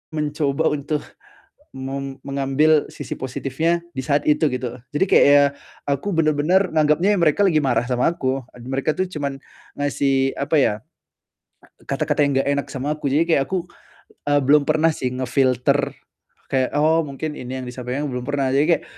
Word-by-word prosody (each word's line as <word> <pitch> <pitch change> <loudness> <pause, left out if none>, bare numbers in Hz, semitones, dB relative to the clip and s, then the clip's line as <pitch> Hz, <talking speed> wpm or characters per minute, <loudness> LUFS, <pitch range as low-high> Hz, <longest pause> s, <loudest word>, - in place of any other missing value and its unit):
mencoba 150 0 0
untuk 150 +1 -2 0.7
mem 135 0 -5
mengambil 140 +3 +2
sisi - - -6
positifnya 140 +6 -1
di 130 - -2
saat 145 0 +1
itu, 150 +1 +3
gitu. 125 -1 -4 0.2
Jadi 190 - +3
kayak - - +6
ya, 145 0 +7 0.4
aku 140 +9 -1
bener-bener 165 +5 +2
nganggepnya 155 +7 +3
ya - - -1
mereka 170 +5 +3
lagi 155 -4 +3
marah 120 -2 +1
sama 125 +5 +1
aku. 135 -5 -2
Ad 120 0 -12
mereka 135 +3 -1
tuh 185 0 0
cuman 140 -5 -4 0.4
ngasih, 135 -2 +1
apa 140 +3 0
ya, 115 - +3 1.2
kata-kata 145 +1 0
yang 140 -1 0
gak - - -2
enak 140 - -2
sama 140 +3 -2
aku. 150 - -4
Jadi 165 +4 +2
kayak 135 -1 0
aku, 180 -2 -2 0.6
eee, 145 - +4
belum 145 +2 +5
pernah 155 +1 +3
sih 125 - -2
nge-filter 130 -1 +1 0.6
kayak, 130 -1 0
"Oh, 160 +2 +3
mungkin 150 +2 -5
ini 130 +1 -6
yang 125 - -7
disampaikan," 125 +4 -4
belum 125 -1 -4
pernah. 140 -2 0
Jadi 145 +2 +4
kayak - - -18
140 Hz, 170 wpm, -21 LUFS, 135-155 Hz, 1.2 s, ya